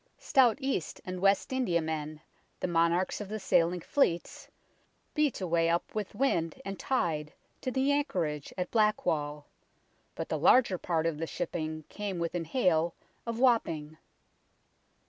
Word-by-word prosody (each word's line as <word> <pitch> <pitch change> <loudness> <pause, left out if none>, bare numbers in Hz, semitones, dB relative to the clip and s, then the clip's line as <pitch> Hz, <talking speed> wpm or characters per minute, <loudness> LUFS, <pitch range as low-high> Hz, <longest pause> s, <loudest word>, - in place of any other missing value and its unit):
Stout 255 -4 +4
East 265 - -2
and 185 0 -4
West 195 +6 +2
Indiamen, 160 -10 -1 0.4
the - - -1
monarchs 170 +3 +1
of 205 - -6
the 215 - -3
sailing 175 -2 +2
fleets, 175 - 0 0.7
beat 300 -4 +1
a - - -1
way 165 -1 +2
up 170 +1 -1
with 215 -1 -4
wind 170 - 0
and 195 -1 -5
tide 155 - -1 0.3
to - - -2
the 265 +2 +1
anchorage 170 - -1
at 180 -1 -3
Black 215 -2 +2
wall, 150 -1 -1 0.7
but - - -4
the - - -2
larger 230 -8 +5
part 165 -2 0
of 165 -2 -1
the 165 - -2
shipping 155 -2 -4
came 205 -3 -4
within 170 0 -2
hail 170 -4 +1 0.3
of 230 -1 -2
Wapping. 160 - +1
175 Hz, 145 wpm, -30 LUFS, 160-215 Hz, 0.7 s, larger